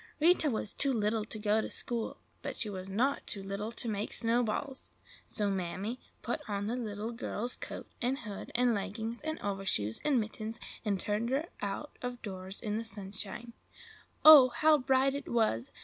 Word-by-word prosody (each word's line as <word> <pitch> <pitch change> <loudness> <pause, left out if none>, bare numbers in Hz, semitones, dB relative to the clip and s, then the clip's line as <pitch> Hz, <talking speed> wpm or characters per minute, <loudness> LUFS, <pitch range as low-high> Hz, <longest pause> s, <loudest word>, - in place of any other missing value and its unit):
Rita 320 -1 +5
was 215 -4 -2
too 275 - +2
little 220 -2 +1
to 220 - -6
go 210 +1 +2
to - - -4
school, 235 -2 -3 0.2
but - - -5
she 215 - 0
was 190 0 -6
not 250 +8 +1
too 200 -3 0
little 200 +3 -3
to 235 - -2
make 210 -1 -2
snowballs. 240 +3 0 0.4
So 210 - -1
Mammy 190 +6 -2 0.2
put 240 - -2
on 200 -1 -2
the 225 +4 -1
little 220 -2 -3
girl's 235 +1 -3
coat - - -7 0.2
and 255 +2 +1
hood, 205 -7 -7
and 245 0 +4
leggings 220 +3 -3
and 315 +1 -3
overshoes 195 - 0
and 285 -4 +3
mittens, 220 +1 -4 0.2
and 205 -3 0
turned 210 +4 -1
her 285 +6 0
out 200 +9 -4
of 245 -1 -4
doors 190 -2 -5
in 210 0 -1
the - - -3
sunshine. 210 +2 -6 0.7
Oh, 295 -5 +12
how 300 +5 +4
bright 265 +1 +3
it 280 0 -4
was! 215 - +1
220 Hz, 180 wpm, -32 LUFS, 205-250 Hz, 0.7 s, Oh